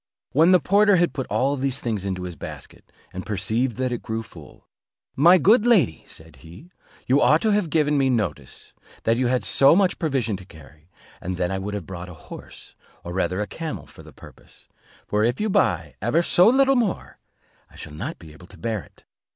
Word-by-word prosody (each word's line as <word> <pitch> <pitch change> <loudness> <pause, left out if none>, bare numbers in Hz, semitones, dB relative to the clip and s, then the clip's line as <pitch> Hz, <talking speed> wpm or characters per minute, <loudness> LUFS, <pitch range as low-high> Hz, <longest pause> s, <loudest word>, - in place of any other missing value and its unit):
When 160 +7 +4
the 185 - +6
porter 205 +4 +3
had 175 -1 +2
put 130 - -4
all 140 +2 0
these 135 -1 -2
things 110 -5 -3
into 95 -2 -3
his 90 -2 -6
basket, - - -11 0.2
and 95 - -6
perceived 110 +4 -1
that 130 -1 -1
it 120 - -4
grew 115 -1 -4
full, - - -16 0.5
"My 170 +7 +6
good 215 +6 +4
lady," 185 - +2
said - - -14
he, 85 - -15 0.3
"you 135 +3 +3
ought 155 - +4
to 220 - +2
have 205 -5 +1
given 150 -2 +1
me 135 -1 +2
notice 95 - -3 0.3
that 115 +1 +2
you 125 0 +1
had 125 0 0
so 140 +3 +5
much 190 -1 +1
provision 130 - -1
to 95 - -12
carry, 75 -1 -17 0.3
and 90 0 -4
then 90 0 -1
I 95 - -2
would 100 +2 -5
have 100 -5 -6
brought 90 0 -8
a 90 - -11
horse, - - -12 0.3
or 85 - -7
rather 95 +1 -1
a - - -1
camel, 160 -2 -6
for - - -16
the - - -14
purpose; - - -16 0.4
for 105 +1 0
if 120 +2 0
you 215 -1 -1
buy 85 - +1
ever 135 - +1
so 180 +2 +4
little 270 +3 +4
more, 230 -7 -2 0.5
I - - -21
shall 75 - -10
not 75 - -6
be 80 -2 -14
able 90 +3 -15
to - - -16
bear 110 -3 -3
it." - - -22
120 Hz, 210 wpm, -23 LUFS, -, 0.5 s, the